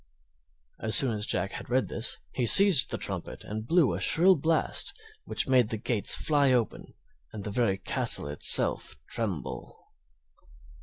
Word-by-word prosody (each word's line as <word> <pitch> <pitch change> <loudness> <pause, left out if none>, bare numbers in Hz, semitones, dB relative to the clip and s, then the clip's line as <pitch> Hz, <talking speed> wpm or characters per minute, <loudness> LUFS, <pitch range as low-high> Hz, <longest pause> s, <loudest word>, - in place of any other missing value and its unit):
As 110 -1 0
soon 135 -3 +3
as 105 0 -4
Jack 95 +2 -3
had - - -10
read 130 +1 -1
this 115 - -4
he 125 -2 -3
seized 195 - +7
the - - -5
trumpet - - -7
and 110 +2 -8
blew 165 - +1
a 85 - -5
shrill 175 - +3
blast, 160 - -2 0.3
which - - -3
made 125 -4 +1
the 110 - -5
gates 110 -1 0
fly 145 -3 0
open 120 -3 -3 0.4
and 105 -2 -9
the 105 - -7
very 100 -3 -1
castle 95 - -2
itself 75 +1 +3
tremble. 100 - -7
120 Hz, 155 wpm, -26 LUFS, 105-140 Hz, 0.4 s, seized